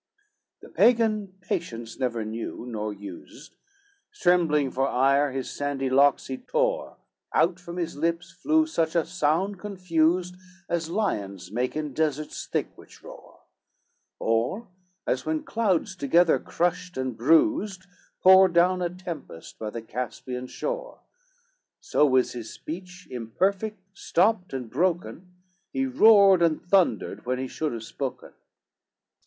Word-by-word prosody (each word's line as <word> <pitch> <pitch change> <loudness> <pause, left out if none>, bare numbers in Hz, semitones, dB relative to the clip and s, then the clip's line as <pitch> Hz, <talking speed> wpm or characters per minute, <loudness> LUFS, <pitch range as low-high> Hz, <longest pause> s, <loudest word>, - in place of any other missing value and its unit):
XXXVIII - - -10
The - - -22
Pagan 225 -4 +3
patience 115 -10 -4
never 120 -4 -1
knew, 115 +2 -5
nor 110 -3 -3
used, 100 - -11 0.6
Trembling 165 - +2
for 135 +1 0
ire, 140 +2 +3
his 130 0 -4
sandy 140 -2 -2
locks 140 +1 +4
he 130 -1 -5
tore, - - -1 0.4
Out 175 +1 +2
from 175 0 -9
his 170 -2 -3
lips 165 +3 -2
flew 315 +1 +2
such 165 - -1
a 170 - +2
sound 180 +3 0
confused, 180 -3 0 0.3
As 165 -1 -2
lions 100 - -2
make 125 +3 -1
in 150 -2 -3
deserts 155 -1 -2
thick, - - -2
which - - -17
roar; - - -13 0.8
Or 120 - -1 0.4
as 130 0 0
when 155 0 -2
clouds 195 -4 0
together 165 +2 +3
crushed 175 0 -2
and 130 -2 -2
bruised, 185 - +2 0.4
Pour 190 0 +8
down 180 +2 +3
a 175 - 0
tempest 170 - -9
by 110 - -4
the 115 +1 -7
Caspian 125 +2 -5
shore; - - -5 0.8
So 150 - +2
was 130 -2 +2
his 115 -2 -7
speech 180 +2 -9
imperfect, 190 - -1 0.2
stopped, 185 +1 +1
and 130 -3 -4
broken, 180 +5 -2 0.4
He 270 - 0
roared 210 -7 +6
and 165 -2 +3
thundered 180 -8 +1
when 130 0 0
he 130 +1 -3
should 155 +3 -3
have 115 -1 -6
spoken. 130 +3 -6
165 Hz, 135 wpm, -26 LUFS, 130-185 Hz, 0.8 s, Pour